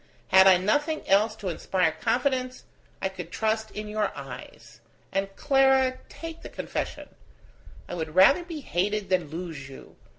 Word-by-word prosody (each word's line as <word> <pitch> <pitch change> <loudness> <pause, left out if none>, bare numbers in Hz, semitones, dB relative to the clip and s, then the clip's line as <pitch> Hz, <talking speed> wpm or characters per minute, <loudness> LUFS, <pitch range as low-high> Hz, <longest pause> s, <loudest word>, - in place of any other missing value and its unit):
Had 190 0 +7
I 185 -1 +8
nothing 290 - 0
else 210 +3 +3
to 205 -4 -5
inspire 180 0 0
confidence, 255 - -1 0.4
I - - +3
could - - -8
trust 220 0 -1
in 210 0 -6
your 210 0 -1
eyes. - - -10 0.3
And, 195 +1 -1
Clara, 265 -2 +3
take 330 0 -8
the - - -9
confession: - - -5 0.8
I - - -7
would 160 -2 -4
rather 235 - +6
be 335 -3 -7
hated 205 -2 -1
than 180 -5 +1
lose 160 -4 -6
you. 135 - -13
210 Hz, 155 wpm, -26 LUFS, 185-260 Hz, 0.8 s, I